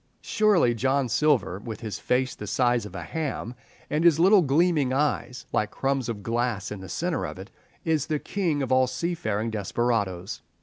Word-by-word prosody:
Surely 200 - +3
John 130 +3 +1
Silver, 120 -5 +2
with 110 0 -7
his 110 -3 -5
face 125 0 0
the 105 -4 -8
size 120 -1 +1
of - - -13
a - - -5
ham, 150 -7 -4 0.3
and 150 +2 0
his 165 -3 +5
little 190 +3 +6
gleaming 150 -2 +2
eyes 135 -2 -1
like 105 - +1
crumbs 135 -1 -1
of 105 -3 -5
glass 115 -3 -1
in 105 - -5
the 95 -1 -9
centre 175 - -1
of - - -5
it, 95 +3 -10 0.3
is 160 -3 +1
the 155 - 0
king 160 -4 -1
of 130 - -4
all 130 0 +4
seafaring 115 -10 -2
desperadoes. 105 -2 -1
125 Hz, 180 wpm, -26 LUFS, 110-155 Hz, 0.3 s, little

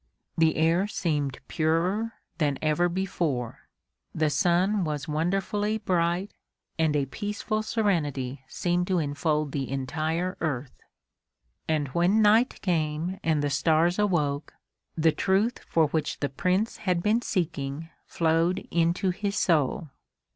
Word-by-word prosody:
The 160 -1 +3
air 165 +5 +2
seemed 145 -9 -1
purer 180 +8 0 0.3
than 145 -4 +1
ever 160 +3 +2
before, 170 -9 -2 0.5
the 155 -1 +1
sun 185 +4 +2
was 150 -3 -3
wonderfully 195 +7 0
bright 180 -1 0 0.5
and 160 -2 +2
a 140 -2 +2
peaceful 210 - -3
serenity 145 - -1
seemed 175 +3 -1
to 185 - +1
enfold 150 -1 0
the 135 -2 -3
entire 155 +7 -2
earth. 135 -5 -2 0.9
And 150 -3 0
when 175 +9 +2
night 220 +5 +4
came 165 +1 -1
and 155 -3 +1
the 145 - 0
stars 160 +6 +2
awoke, 155 -8 0 0.4
the 160 0 +4
truth 200 +8 +1
for 165 -1 +2
which 155 0 -2
the 145 - -1
Prince 185 - 0
had 180 -4 -1
been 220 +3 +2
seeking 165 - -3 0.2
flowed 165 +3 +1
into 170 +2 +2
his 200 +2 -3
soul. 155 -1 +1
165 Hz, 125 wpm, -27 LUFS, 150-190 Hz, 0.9 s, night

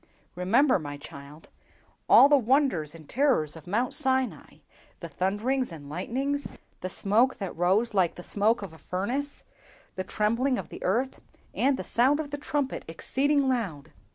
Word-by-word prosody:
"Remember, 225 +9 +3
my 145 -2 -6
child, 140 +2 -12 0.6
all 275 - +9
the 290 - +5
wonders 245 - +1
and 160 -3 -13
terrors 250 - +1
of 160 0 -13
Mount 235 +7 0
Sinai—the 265 -3 -3
thunders 220 +6 -1
and 145 -4 -10
lightnings, 270 - -2 0.3
the 185 - -4
smoke 220 +7 +2
that 195 -3 -5
rose 195 +7 +2
like 185 -4 +2
the 175 - -9
smoke 210 +3 +1
of 185 -5 -8
a 160 - -15
furnace, 245 - -3 0.5
the 185 - -4
trembling 230 +7 0
of - - -6
the - - -10
earth, 245 +8 0 0.3
and 270 0 +2
the - - -4
sound 265 +5 +2
of 295 -2 -4
the 290 - -4
trumpet 285 -2 -2
exceeding 275 - +1
loud! 200 - -2
225 Hz, 155 wpm, -27 LUFS, 180-265 Hz, 0.6 s, all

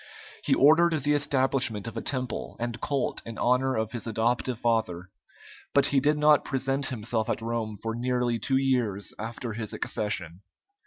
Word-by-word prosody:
He - - +3
ordered 160 +4 +5
the 145 +1 +3
establishment 130 -6 +1
of 115 - -6
a - - -3
temple 130 -4 -3
and 120 -1 -4
cult 140 -3 -1
in 115 -1 -8
honor 130 +2 +2
of 110 0 -1
his 120 -2 -4
adoptive 115 +2 0
father, 110 -7 -1 0.6
but 140 -1 +5
he 140 0 +3
did 150 +3 +2
not 150 0 +5
present 135 +1 -1
himself 110 -2 -2
at - - 0
Rome 115 -2 -3
for 115 0 -2
nearly 120 0 0
two 135 +3 +1
years 125 -7 0
after 115 +1 -5
his 110 -1 -3
accession. 90 -4 -2
120 Hz, 165 wpm, -27 LUFS, 110-135 Hz, 0.6 s, ordered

